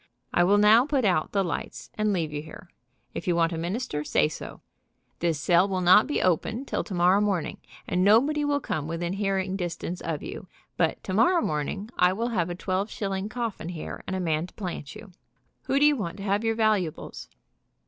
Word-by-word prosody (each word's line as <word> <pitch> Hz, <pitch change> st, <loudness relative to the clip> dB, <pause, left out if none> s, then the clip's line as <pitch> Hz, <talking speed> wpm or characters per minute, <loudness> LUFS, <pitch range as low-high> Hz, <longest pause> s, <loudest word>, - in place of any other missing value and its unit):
I 175 Hz, -, +4 dB
will 200 Hz, +3 st, +4 dB
now 220 Hz, +5 st, +6 dB
put 275 Hz, -5 st, +1 dB
out 180 Hz, -5 st, +1 dB
the 200 Hz, -1 st, +1 dB
lights, 175 Hz, -, -5 dB
and 215 Hz, 0 st, 0 dB
leave 165 Hz, -6 st, -1 dB
you 145 Hz, -, -3 dB
here. 160 Hz, +3 st, -12 dB, 0.4 s
If -, -, -6 dB
you 175 Hz, -, +2 dB
want 165 Hz, 0 st, +2 dB
a -, -, -3 dB
minister, 170 Hz, -3 st, -3 dB
say 150 Hz, +1 st, +2 dB
so. 155 Hz, -, -9 dB, 0.6 s
This 165 Hz, -3 st, 0 dB
cell 175 Hz, +5 st, +4 dB
will 190 Hz, -1 st, -1 dB
not 185 Hz, +4 st, +6 dB
be 295 Hz, -, 0 dB
opened 220 Hz, -, 0 dB
till -, -, -1 dB
tomorrow 185 Hz, +1 st, +3 dB
morning, 195 Hz, -6 st, -1 dB, 0.3 s
and 180 Hz, -, +1 dB
nobody 270 Hz, +9 st, +4 dB
will 290 Hz, 0 st, +1 dB
come 155 Hz, -, -3 dB
within 170 Hz, +2 st, -3 dB
hearing 195 Hz, -1 st, -1 dB
dis 175 Hz, -3 st, -3 dB
tance 180 Hz, +1 st, -5 dB
of 160 Hz, -3 st, -4 dB
you, 185 Hz, -, -7 dB, 0.3 s
but 165 Hz, -2 st, 0 dB
tomorrow 235 Hz, -, +3 dB
morning 150 Hz, +6 st, -2 dB
z -, -, -31 dB
I 180 Hz, +1 st, +5 dB
will 230 Hz, +5 st, -2 dB
have 180 Hz, -7 st, 0 dB
a 175 Hz, -, -4 dB
twelve 185 Hz, +3 st, -2 dB
shilling 195 Hz, 0 st, -3 dB
coffin 225 Hz, -7 st, -4 dB
here 170 Hz, -3 st, -7 dB
and 190 Hz, -, -2 dB
a -, -, -2 dB
man 165 Hz, -1 st, -1 dB
to -, -, -20 dB
plant 180 Hz, -8 st, -6 dB
you. 210 Hz, -3 st, -11 dB, 0.5 s
Who 270 Hz, -, +1 dB
do 290 Hz, -, +5 dB
you 295 Hz, 0 st, +5 dB
want 195 Hz, -7 st, -4 dB
to 195 Hz, -, -7 dB
have 200 Hz, +2 st, 0 dB
your 225 Hz, 0 st, +1 dB
valuables? 205 Hz, -, -1 dB
190 Hz, 210 wpm, -26 LUFS, 170-215 Hz, 0.6 s, now